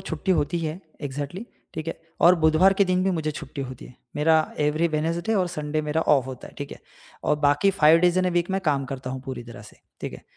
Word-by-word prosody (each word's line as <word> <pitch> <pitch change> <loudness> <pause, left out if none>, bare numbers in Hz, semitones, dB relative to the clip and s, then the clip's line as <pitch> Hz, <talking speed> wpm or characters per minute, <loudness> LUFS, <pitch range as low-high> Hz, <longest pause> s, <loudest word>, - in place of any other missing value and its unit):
छुट्टी 190 0 -1
होती 165 0 0
है 165 +2 -4 0.2
एक्ज़ैक्टली 145 - -5 0.3
ठीक 155 0 -5
है। - - -6 0.2
और 175 +1 +7
बुधवार 160 +3 +4
के 200 - +4
दिन 185 0 +1
भी 195 - +2
मुझे 160 -4 -1
छुट्टी 145 -1 -7
होती 130 -1 -8
है। - - -15 0.2
मेरा 160 +2 +4 0.2
एवरी 150 +3 +2
वेडनेसडे 165 +7 -1
और 190 -3 +2
संडे 155 -2 -2
मेरा 150 +1 0
ऑफ 135 -5 +3
होता 130 -2 -8
है। - - -16
ठीक 145 -1 -5
है? - - -11 0.5
और - - +2
बाकी 145 +6 +3
5 165 -4 +5
डेज़ 180 +1 +3
इन 185 - +2
अ, - - +2
वीक 175 +1 0
मैं 190 0 0
काम 145 -6 0
करता 130 -1 -6
हूँ 130 0 -5
पूरी 130 -2 -6
तरह 115 -3 -11
से। - - -15 0.2
ठीक - - -5
है? - - -10
155 Hz, 245 wpm, -25 LUFS, 145-175 Hz, 0.5 s, और